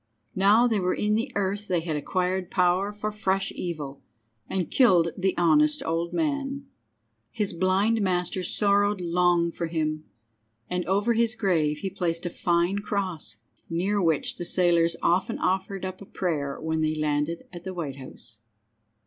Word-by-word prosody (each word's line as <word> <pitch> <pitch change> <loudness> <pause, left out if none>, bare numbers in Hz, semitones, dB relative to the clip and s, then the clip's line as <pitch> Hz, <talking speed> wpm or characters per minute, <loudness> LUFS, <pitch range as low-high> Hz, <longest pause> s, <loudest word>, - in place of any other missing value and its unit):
Now 205 +5 +5
they 225 -4 +2
were 185 -1 0
in 210 0 0
the 230 +5 0
earth 200 +1 -1
they 175 -2 +1
had 160 -2 -3
acquired 180 +4 -1
power 185 +2 +2
for 210 +1 -4
fresh 195 -2 0
evil, 150 -6 -5 0.5
and 185 -3 -2
killed 180 -10 +5
the 190 0 0
honest 300 - +4
old 165 +1 -1
man! 280 -3 -2 0.6
His 210 -4 -2
blind 190 +6 +2
master 185 -1 0
sorrowed 205 +2 +2
long 175 -1 +2
for 170 0 -3
him, 155 -1 -2 0.6
and 180 0 -1
over 205 +5 +2
his 230 0 +2
grave 160 -9 +1
he 195 - -3
placed 175 -2 -2
a 175 - -2
fine 175 +4 +1
cross, 185 - -2 0.3
near 190 +5 0
which 160 -4 +1
the - - -4
sailors 170 -2 +3
often 180 +2 +2
offered 190 +1 -1
up 185 +1 -6
a 200 - -10
prayer 145 -7 -2
when 160 0 -1
they 155 0 +1
landed 155 +2 -1
at 175 -1 -8
the 190 - -5
White 145 -6 -4
House. 120 -4 -6
180 Hz, 160 wpm, -26 LUFS, 165-200 Hz, 0.6 s, Now